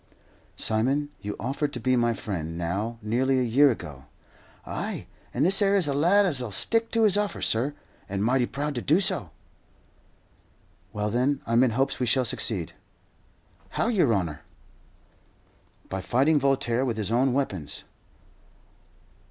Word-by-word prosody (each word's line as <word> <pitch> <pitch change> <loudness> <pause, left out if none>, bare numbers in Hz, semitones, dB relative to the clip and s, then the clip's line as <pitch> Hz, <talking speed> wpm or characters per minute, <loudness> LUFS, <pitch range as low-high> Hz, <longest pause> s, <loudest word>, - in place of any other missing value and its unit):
"Simon, 135 +7 0
you 105 0 -5
offered 140 +4 -2
to 125 - -4
be 130 +2 +1
my 120 -1 +2
friend, 85 -7 -5
now 100 +7 -3
nearly 130 +5 +1
a 130 - +2
year 135 +5 +5
ago." 75 - -6 0.6
"Ay, - - -4 0.3
and 135 +5 +1
this 195 +3 +4
'ere 200 0 +3
is 185 -6 +3
a 140 - 0
lad 175 +8 +4
as'll 130 - 0
stick 225 - +1
to 230 -1 +1
his 205 -2 +4
offer, 205 0 -1
sur, 130 +6 0 0.3
and 100 +1 -2
mighty 125 +2 +2
proud 145 +1 -3
to 120 - -3
do 155 +9 +3
so." 185 - 0 1.6
"Well, 105 0 -2
then, 130 +4 +1
I'm 115 +1 +3
in 130 - +3
hopes 135 +1 0
we 125 - 0
shall 130 +2 +2
succeed." 100 -6 -1 1.0
"How, 230 - +1
yer 180 - +3
honour?" 85 -8 -1 1.5
"By 95 0 -4
fighting 140 +9 +2
Voltaire 135 -3 +1
with 120 -4 -2
his 105 -1 -1
own 125 +3 +3
weapons." 95 - -3
125 Hz, 150 wpm, -26 LUFS, 110-145 Hz, 1.6 s, year